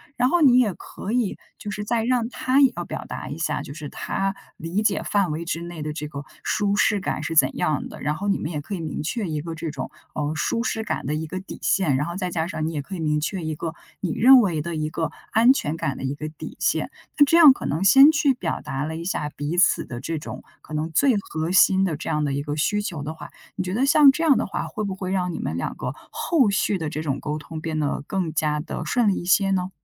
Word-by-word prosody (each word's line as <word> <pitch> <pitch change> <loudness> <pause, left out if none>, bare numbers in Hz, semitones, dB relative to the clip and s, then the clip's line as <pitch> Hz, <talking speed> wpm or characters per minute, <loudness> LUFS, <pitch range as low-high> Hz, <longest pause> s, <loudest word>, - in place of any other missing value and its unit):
然 250 - +2
后 350 +3 +2
你 260 -4 +7
也 220 -6 +2
可 195 - -8
以 240 -5 0 0.2
就 205 - -6
是 210 0 -4
再 230 +1 0
让 240 -1 +1
他 260 +1 +1
也 270 -2 +6
要 175 - -2
表 - - -6
达 - - -6
一 145 - -5
下， 165 - -1
就 140 - -8
是 150 -1 -7
他 195 0 -2 0.2
理 170 +5 -2
解 210 -2 +1
范 200 -5 +1
围 155 +2 -3
之 165 0 -3
内 170 -2 -7
的 150 0 -3
这 150 -1 -5
个 145 -1 -7 0.2
舒 205 -1 +1
适 205 0 +3
感 155 - -2
是 160 +2 -3
怎 160 - +4
样 155 -5 0
的， - - -11
然 150 +2 -1
后 195 +6 -4
你 195 - +2
们 155 - -4
也 150 - -3
可 180 - -7
以 - - -5
明 155 -2 -4
确 195 +6 -2
一 155 -1 -2
个 165 +1 -6
这 160 0 -4
种， 135 -3 -6 0.2
呃， 150 0 -2
舒 230 +9 0
适 220 -2 -2
感 - - -3
的 150 +3 -1
一 155 +1 -3
个 185 +4 -5
底 190 - -10
线。 165 -9 +2
然 145 - 0
后 170 - -5
再 185 -1 -2
加 165 -1 -1
上 155 -3 -3
你 - - -2
也 150 - -2
可 190 +7 -7
以 - - -6
明 150 -1 +1
确 175 +4 -3
一 155 0 -2
个 165 +2 -4 0.3
你 180 - -1
认 260 +3 +8
为 175 -9 +1
的 170 +2 -4
一 155 0 -1
个 160 +1 -2 0.2
安 230 +3 +6
全 155 - -2
感 155 -5 -2
的 - - -7
一 135 +1 -2
个 155 +1 -5
底 155 - -9
线， - - 0 0.3
那 290 - +7
这 305 - +3
样 315 -5 +10
可 - - -8
能 160 +6 -1
先 270 +10 +8
去 300 -3 +3
表 255 - -3
达 135 +1 -3
了 160 +1 -4
一 165 - -5
下 150 -5 -2
彼 150 +3 -4
此 185 - +4
的 120 -4 -7
这 165 +4 -3
种 - - -8 0.2
可 155 - -12
能 155 +1 -1
最 260 - +3
核 160 -4 -3
心 190 0 +5
的 170 -5 -1
这 - - -6
样 150 0 0
的 140 - -1
一 140 +1 -2
个 145 0 -4
需 210 +7 +1
求 170 -8 -4
的 155 +2 -4
话， 160 - -10 0.3
你 - - -2
觉 180 0 -4
得 250 +6 +2
像 285 0 +7
这 300 +4 -4
样 285 -6 +5
的 - - 0
话， 195 - -4
会 215 - -4
不 195 -2 -3
会 185 -1 -4
让 180 -2 0
你 - - -5
们 - - -3
两 - - -3
个 - - -4 0.2
后 285 -10 +2
续 200 0 +1
的 160 -4 -3
这 155 - -4
种 140 -3 -2
沟 150 0 -3
通 160 +1 -8
变 155 -1 -3
得 145 -1 -1
更 180 -3 -2
加 150 -1 0
地 155 - -5
顺 245 -3 +1
利 200 - +3
一 - - -4
些 195 +2 +3
呢？ 185 -1 0
170 Hz, 300 characters per minute, -23 LUFS, 155-210 Hz, 0.3 s, 样